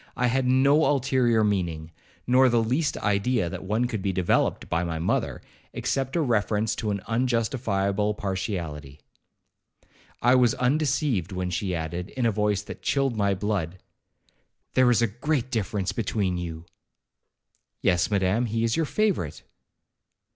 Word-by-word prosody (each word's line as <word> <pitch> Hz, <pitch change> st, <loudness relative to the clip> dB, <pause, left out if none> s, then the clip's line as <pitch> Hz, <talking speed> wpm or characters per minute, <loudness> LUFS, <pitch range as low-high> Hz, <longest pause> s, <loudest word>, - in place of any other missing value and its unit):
I 125 Hz, -, +1 dB
had 125 Hz, +1 st, +1 dB
no 140 Hz, +4 st, +4 dB
ulterior 125 Hz, -5 st, +2 dB
meaning, 85 Hz, -6 st, -1 dB, 0.3 s
nor 130 Hz, +1 st, +5 dB
the 120 Hz, -1 st, +3 dB
least 145 Hz, +7 st, 0 dB
idea 100 Hz, -2 st, 0 dB
that -, -, -6 dB
one 110 Hz, +5 st, 0 dB
could 115 Hz, -5 st, -3 dB
be 100 Hz, 0 st, 0 dB
developed 90 Hz, -1 st, +1 dB
by 85 Hz, +2 st, 0 dB
my 85 Hz, -2 st, -3 dB
mother, 80 Hz, -, -1 dB, 0.3 s
except 135 Hz, -1 st, -2 dB
a 170 Hz, -, +2 dB
reference 110 Hz, -4 st, +1 dB
to 110 Hz, -, -2 dB
an 100 Hz, -1 st, -2 dB
unjustifiable 110 Hz, -4 st, 0 dB
partiality. 85 Hz, -8 st, -4 dB, 1.2 s
I 120 Hz, +1 st, +4 dB
was 125 Hz, -3 st, +4 dB
undeceived, 135 Hz, -, 0 dB
when 90 Hz, -1 st, -3 dB
she 90 Hz, +1 st, -2 dB
added, 85 Hz, +3 st, -4 dB
in 125 Hz, -, +1 dB
a 115 Hz, -, +3 dB
voice 105 Hz, -1 st, 0 dB
that -, -, -9 dB
chilled 135 Hz, -3 st, 0 dB
my 100 Hz, -2 st, +1 dB
blood, 95 Hz, -4 st, -2 dB, 1.0 s
'There 130 Hz, -1 st, +4 dB
is 120 Hz, -1 st, +3 dB
a -, -, +3 dB
great 140 Hz, -5 st, 0 dB
difference 105 Hz, -4 st, -1 dB
between 100 Hz, -4 st, -1 dB
you.' 80 Hz, -1 st, -6 dB, 1.2 s
'Yes, 90 Hz, -2 st, +2 dB
Madam, 100 Hz, +4 st, +1 dB
he 115 Hz, +1 st, -1 dB
is 115 Hz, -1 st, +1 dB
your 165 Hz, -2 st, 0 dB
favourite.' 200 Hz, -, -1 dB
105 Hz, 145 wpm, -26 LUFS, 95-125 Hz, 1.2 s, nor